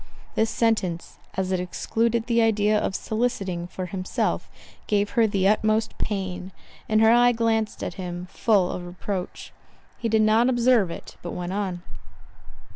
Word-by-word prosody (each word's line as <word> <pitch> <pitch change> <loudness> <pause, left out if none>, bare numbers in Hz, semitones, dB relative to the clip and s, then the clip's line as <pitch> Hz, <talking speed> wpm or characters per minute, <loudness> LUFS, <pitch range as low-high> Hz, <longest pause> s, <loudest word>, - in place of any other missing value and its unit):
This 220 0 +1
sentence, 210 -8 -1 0.2
as 190 0 -1
it 185 - +1
excluded 225 +5 -1
the 235 -1 +2
idea 215 -1 +3
of 210 -2 0
soliciting 195 -7 -2
for 185 +1 -5
himself, 185 +1 -2 0.4
gave 205 -1 +1
her 230 -3 +3
the 195 -2 +1
utmost 215 +1 +2
pain; 190 -2 -3 0.4
and 215 0 +3
her 225 0 +6
eye 245 +1 +5
glanced 225 -2 0
at - - -3
him, 175 0 -5
full 200 -6 +2
of 180 - -5
reproach. 180 +1 -5 0.5
He 230 - -1
did 220 0 +3
not 220 +3 +4
observe 240 -5 +3
it, 170 - -9
but 175 - -6
went 180 +1 -4
on. 190 -3 -3
210 Hz, 155 wpm, -25 LUFS, 185-225 Hz, 0.5 s, her